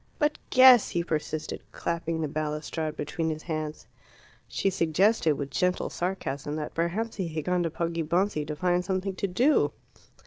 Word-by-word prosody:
"But 300 -2 +1
guess!" 255 -3 +8
he 170 - -1
persisted, 155 -1 -3
clapping 165 -1 -2
the 155 - 0
balustrade 155 +1 -3
between 160 +2 -2
his 155 0 -4
hands. 155 -2 -4 0.6
She 195 - 0
suggested, 170 +1 +3
with 140 -1 -5
gentle 180 0 0
sarcasm, 150 -6 -3
that 155 -1 -4
perhaps 185 +8 -2
he 190 -4 -1
had 155 -2 -4
gone 180 -1 +1
to 170 - 0
Poggibonsi 170 +1 0
to 150 - -3
find 180 +2 +1
something 190 +1 -2
to 200 - -1
do. 195 - +3
170 Hz, 160 wpm, -27 LUFS, 155-185 Hz, 0.6 s, guess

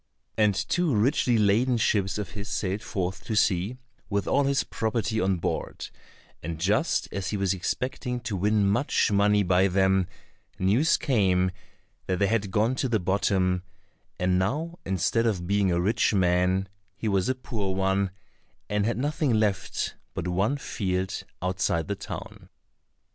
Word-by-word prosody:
And 105 -3 +3
two 135 - 0
richly 120 +2 +2
laden 110 +4 +3
ships 100 -3 +1
of 105 - -4
his 105 0 -6
sailed 100 +1 -2
forth 95 -2 -3
to 110 - -2
sea 100 +3 +1 0.3
with 100 -2 -1
all 140 0 +3
his 140 +1 +2
property 110 -1 -1
on 95 0 +1
board, 85 - -3 0.5
and 80 0 -5
just 105 - +1
as 95 -2 -3
he 105 - -2
was 100 -1 +1
expecting 125 +6 -3
to 115 -4 -3
win 105 +2 +2
much 105 +3 +2
money 105 0 +3
by 95 +1 +3
them, 95 -1 +2 0.5
news 110 - +3
came 95 -8 +2 0.6
that 95 - 0
they 100 - +2
had 105 -1 0
gone 110 +5 +2
to 130 - 0
the 110 -2 +2
bottom, 90 -1 +1 0.6
and 90 0 +2
now 155 - -2
instead 95 +5 +1
of 95 -6 -1
being 100 0 +2
a 85 - +1
rich 105 +4 +2
man 90 +1 +2 0.3
he 110 - -3
was 100 +1 +1
a 130 - +1
poor 105 -7 -3
one, 95 0 +1 0.6
and 105 0 0
had 115 - -1
nothing 145 +2 0
left 105 -3 0 0.2
but - - -3
one 100 +10 +1
field 95 -7 -2 0.2
outside 90 -3 0
the - - -1
town. - - -8
100 Hz, 160 wpm, -26 LUFS, 95-115 Hz, 0.6 s, And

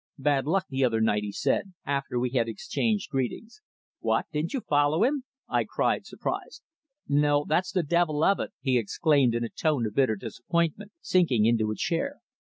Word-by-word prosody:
"Bad 140 -1 +1
luck 185 +2 +1
the 135 0 -1
other 115 -3 +2
night," 105 -2 +2
he 105 -1 -4
said, 190 - -1
after 140 -3 -2
we 125 0 -1
had 120 -3 +1
exchanged 205 - -2
greetings. 180 - -3 0.4
"What, - - +1
didn't 155 +2 -1
you 270 - -1
follow 145 +4 +2
him?" 270 +1 +1 0.2
I - - +1
cried, - - -1
surprised. - - -5 0.4
"No, 145 0 +2
that's 180 +4 +1
the 185 -3 +1
devil 155 -1 +1
of 195 - +4
it," - - -3
he 130 -2 +2
exclaimed 130 +2 +2
in 120 - 0
a 115 - -3
tone 150 -7 0
of 105 - -4
bitter 130 -3 +2
disappointment, 170 - -2
sinking 140 -12 +3
into 115 -2 +2
a 110 - -2
chair. 225 - -2
145 Hz, 185 wpm, -27 LUFS, 120-175 Hz, 0.4 s, of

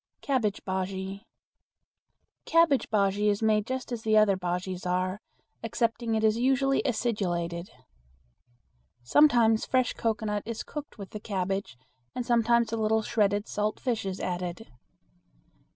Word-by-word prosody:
Cabbage 240 -8 0
Bujea. 190 +1 -3 1.2
Cabbage 330 -5 +3
bujea 205 0 +2
is 205 +2 0
made 215 -1 +2
just 260 -1 -4
as 225 -2 -5
other 215 -2 +5
bujeas 180 0 -3
are, 185 +3 -1 0.4
excepting 230 0 -1
it 220 - 0
is 220 +1 +3
usually 270 +2 +2
acidulated. 185 -7 -2 1.3
Sometimes 230 - +4
fresh 255 -1 +1
cocoanut 215 -2 -1
is 230 +1 -5
cooked 295 -4 -8
with 200 -2 -9
the 210 - -6
cabbage 195 - -3 0.4
and 250 - -3
sometimes 235 -1 +3
a 230 - -1
little 220 0 +1
shredded 205 -1 +1
salt 210 +1 -2
fish 240 -4 -1
is 190 0 -4
added. 180 +4 -4
215 Hz, 125 wpm, -28 LUFS, 195-235 Hz, 1.3 s, other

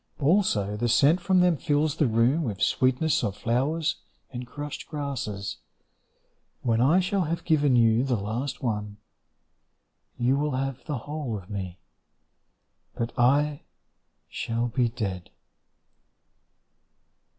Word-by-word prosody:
Also 135 - +2
the 120 +3 -1
scent 145 +9 +4
from 185 +1 +3
them 180 -2 +4
fills 150 +1 0
the 150 - +3
room 115 +7 +2
With 105 -8 -3
sweetness 130 +8 +2
of 100 -1 -2
flowers 140 +7 0 0.4
and 125 0 -6
crushed 145 +2 -7
grasses. 125 -9 -4 1.1
When 115 -1 +2
I 155 +9 +5
shall 190 0 0
have 165 +2 -3
given 145 -5 +3
you 115 0 +4
the 130 -2 +1
last 120 +7 -4
one, 105 -3 -2 1.2
You 125 +3 +2
will 145 -1 -1
have 135 -1 -3
the 150 -4 -2
whole 145 -7 -3
of 95 0 -12
me, 95 -3 -5 1.2
But 115 0 -3
I 145 +4 +2 0.7
shall 115 +1 -2
be 120 0 +1
dead. 100 -7 -4
130 Hz, 125 wpm, -26 LUFS, 115-150 Hz, 1.2 s, I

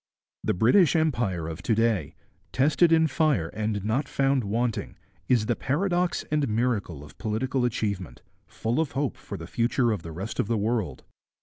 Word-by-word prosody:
The - - 0
British 140 - +4
Empire 120 - 0
of 80 +2 -6
to 110 +5 +1
day, 110 -8 +1 0.4
tested 155 +5 +3
in 160 0 +5
fire 150 - +1
and 105 -1 -3
not 130 +6 0
found 135 -2 +1
wanting, 115 +3 -2 0.3
is 120 -4 +3
the 120 - +1
paradox 175 - 0
and 150 -2 +1
miracle 105 - -1
of 75 - -15
political 125 +3 -1
achievement, 100 - -3 0.2
full 115 +6 -2
of 160 -3 -1
hope 140 0 -1
for - - -8
the - - -8
future 120 +1 +1
of 105 -5 -2
the 80 - -8
rest 95 +7 -6
of - - +1
the 115 0 +1
world. 105 - -1
115 Hz, 175 wpm, -26 LUFS, 100-140 Hz, 0.4 s, in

